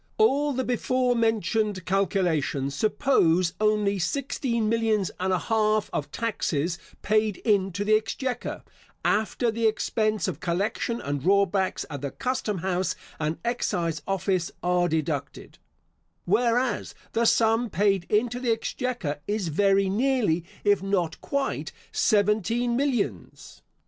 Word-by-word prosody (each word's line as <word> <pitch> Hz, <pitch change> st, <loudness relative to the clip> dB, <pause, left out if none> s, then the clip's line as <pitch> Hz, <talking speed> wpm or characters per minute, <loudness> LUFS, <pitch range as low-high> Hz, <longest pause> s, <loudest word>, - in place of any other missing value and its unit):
All 295 Hz, -9 st, +3 dB
the 260 Hz, 0 st, -1 dB
before 250 Hz, 0 st, +1 dB
mentioned 220 Hz, -4 st, 0 dB
calculations 175 Hz, -8 st, 0 dB
suppose 185 Hz, -, +2 dB
only 210 Hz, -2 st, +2 dB
sixteen 235 Hz, -, -1 dB
millions 220 Hz, -4 st, +1 dB
and 190 Hz, +1 st, 0 dB
an 185 Hz, -, +2 dB
half 215 Hz, 0 st, +1 dB
of 145 Hz, -1 st, -3 dB
taxes 170 Hz, -6 st, -1 dB, 0.2 s
paid 215 Hz, -1 st, +1 dB
into 200 Hz, -2 st, +1 dB
the 215 Hz, +1 st, +5 dB
exchequer, 245 Hz, +4 st, -3 dB, 0.4 s
after 220 Hz, +2 st, +1 dB
the 225 Hz, 0 st, +1 dB
expense 215 Hz, -2 st, 0 dB
of -, -, -4 dB
collection 200 Hz, +6 st, -1 dB
and 140 Hz, -1 st, -3 dB
drawbacks 195 Hz, +2 st, +2 dB
at 145 Hz, -4 st, -6 dB
the 140 Hz, -, -2 dB
custom 235 Hz, -, -2 dB
house 185 Hz, 0 st, 0 dB, 0.2 s
and 155 Hz, +1 st, -1 dB
excise 170 Hz, -9 st, -1 dB
office 190 Hz, -2 st, 0 dB
are 180 Hz, 0 st, +2 dB
deducted; 155 Hz, -3 st, -3 dB, 0.7 s
whereas 235 Hz, +5 st, +1 dB, 0.2 s
the 230 Hz, +1 st, +1 dB
sum 225 Hz, +1 st, +3 dB
paid 195 Hz, -3 st, +1 dB
into 240 Hz, +3 st, +1 dB
the 250 Hz, -1 st, -2 dB
exchequer 225 Hz, -, -2 dB
is 205 Hz, -4 st, -1 dB
very 195 Hz, +4 st, +3 dB
nearly, 210 Hz, -5 st, +1 dB, 0.2 s
if 205 Hz, -2 st, +3 dB
not 185 Hz, -4 st, -1 dB
quite, 280 Hz, -1 st, -2 dB, 0.2 s
seventeen 220 Hz, +3 st, +2 dB
millions. 235 Hz, -, -2 dB
210 Hz, 125 wpm, -26 LUFS, 180-230 Hz, 0.7 s, the